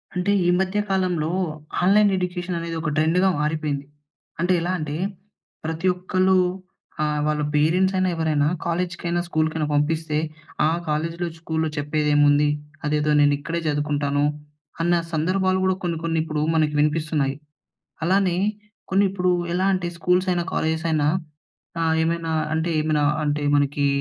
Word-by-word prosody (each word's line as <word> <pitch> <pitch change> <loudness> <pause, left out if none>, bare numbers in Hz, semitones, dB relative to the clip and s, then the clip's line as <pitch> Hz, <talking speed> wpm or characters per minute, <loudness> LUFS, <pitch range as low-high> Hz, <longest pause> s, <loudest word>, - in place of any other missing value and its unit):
అంటే 180 +3 +1
ఈ - - +3
మధ్య 190 +2 0
కాలంలో 180 -5 0 0.5
ఆన్లైన్ 200 +2 +5
ఎడ్యుకేషన్ 180 -1 -3
అనేది 165 0 -4
ఒక 160 - -1
ట్రెండ్‌గా 165 +5 +3
మారిపోయింది. 150 -2 -1 0.5
అంటే 180 +2 +2
ఎలా 175 +2 -1
అంటే 150 -1 -4 0.7
ప్రతి 160 +3 -2
ఒక్కలు 185 +1 +1 0.7
ఆహ్, 150 0 0
వాళ్ళ 150 0 0
పేరెంట్స్ 175 +6 +3
అయినా 185 0 +2
ఎవరైనా. 155 -3 +1 0.2
కాలేజ్‌కైనా 175 0 -1
స్కూల్‌కైనా 155 -1 0
పంపిస్తే, 155 +1 0 0.5
ఆ - - +3 0.2
కాలేజీలో 165 +3 -1
స్కూల్‌లో 160 -1 -1
చెప్పేదేముంది. 145 0 +3 0.4
అదేదో 150 0 +1
నేను 145 0 +5
ఇక్కడే 165 +3 -3
చదువుకుంటాను 145 -1 0 0.6
అన్న 175 +1 +2 0.2
సందర్భాలు 185 +4 +1
గూడా 190 0 +2
కొన్ని 170 -2 -1
కొన్ని 165 -1 0
ఇప్పుడు 155 -2 -2
మనకు 155 -2 +2
వినిపిస్తున్నాయి. 150 -2 +1 0.7
అలానే 185 0 +2 0.5
కొన్ని 195 +1 +4
ఇప్పుడు 185 -1 0 0.2
ఎలా 185 +2 +1
అంటే 185 -2 -1
స్కూల్స్ 180 +2 +1
అయినా 175 -1 0
కాలేజెస్ 160 +1 -1
అయినా. 150 -2 +2 0.7
ఆహ్, 160 -1 +2
ఏమైనా 165 0 -1 0.2
అంటే 160 +2 0
ఏమైనా 155 -1 +1 0.2
అంటే 145 0 -1
మనకి 145 0 +2
160 Hz, 135 wpm, -23 LUFS, 150-180 Hz, 0.7 s, ఆన్లైన్